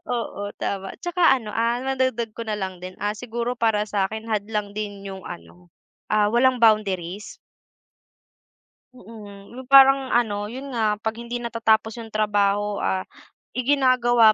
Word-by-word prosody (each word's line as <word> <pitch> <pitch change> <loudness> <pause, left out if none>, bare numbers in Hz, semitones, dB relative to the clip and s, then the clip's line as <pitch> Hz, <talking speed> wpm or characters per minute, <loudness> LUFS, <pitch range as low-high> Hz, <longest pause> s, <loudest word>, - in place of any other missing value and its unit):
O - - 0
oo, 205 - -6 0.2
tama, 195 -1 -3
tsaka 350 0 -3 0.2
ano, 225 -4 -8
ah, 230 +3 0
madagdag 260 -3 0
ko - - -4
na 215 -1 -2
lang 190 -1 -4
din, 185 0 -7
ah, 210 +1 -1
siguro 240 +1 -4
para 220 -2 +1
sa'kin 215 +3 -2
hadlang 210 0 -1
din 205 -2 -5
yung 190 -1 -8
ano, 85 +1 -11 0.4
ah, 210 -1 +3
walang 245 +2 +3
boundaries. 205 -4 +1 1.6
Mm, 205 -3 -13
'yung 255 +1 -10
parang 270 -1 +7
ano, 210 -3 0
'yun 265 +3 -7
nga, 215 -3 +1
'pag 220 +1 -3
hindi 235 +1 -5
natatapos 225 -2 +1
'yong 225 - -10
trabaho, 205 -1 0
ah, 185 0 -1 0.5
iginagawa 250 -4 +4
220 Hz, 145 wpm, -23 LUFS, 205-240 Hz, 1.6 s, parang